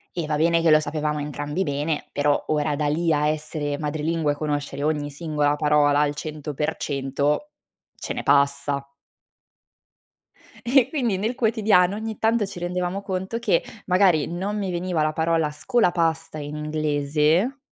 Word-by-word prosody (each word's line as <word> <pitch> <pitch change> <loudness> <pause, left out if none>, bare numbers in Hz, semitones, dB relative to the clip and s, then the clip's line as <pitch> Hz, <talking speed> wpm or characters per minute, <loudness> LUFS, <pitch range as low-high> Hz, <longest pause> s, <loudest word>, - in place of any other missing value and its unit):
E 170 -3 -2
va 150 - 0
bene 165 +2 +3
che 165 -1 +4
lo 155 0 +6
sapevamo 150 0 -2
entrambi 145 +4 -3
bene, 145 0 -2
però 145 0 +1
ora 150 -1 0
da 150 0 -1
lì 165 +2 +1
a 150 0 +2
essere 150 -1 -3
madrelingua 155 0 -1
e - - -8
conoscere 145 -1 -3
ogni 150 -1 0
singola 150 -1 0
parola 150 -1 +3
al 145 0 0
100% 150 - -2 0.4
ce - - -6
ne - - -3
passa. 140 0 +2 1.8
E 255 +1 +4
quindi, 245 -9 0
nel 215 +5 -1
quotidiano 215 -6 +3
ogni 220 0 -5
tanto, 225 -1 +2
ci 190 - -8
rendevamo 180 +2 -2
conto 190 +3 -3
che, 235 - +2 0.2
magari 180 -4 +3
non 190 +5 -3
mi 195 -2 -2
veniva 175 -2 -1
la 155 0 +1
parola 160 -1 +1
scolapasta 165 - 0
in 145 0 -6
inglese 150 - +1
155 Hz, 150 wpm, -24 LUFS, 145-180 Hz, 1.8 s, lo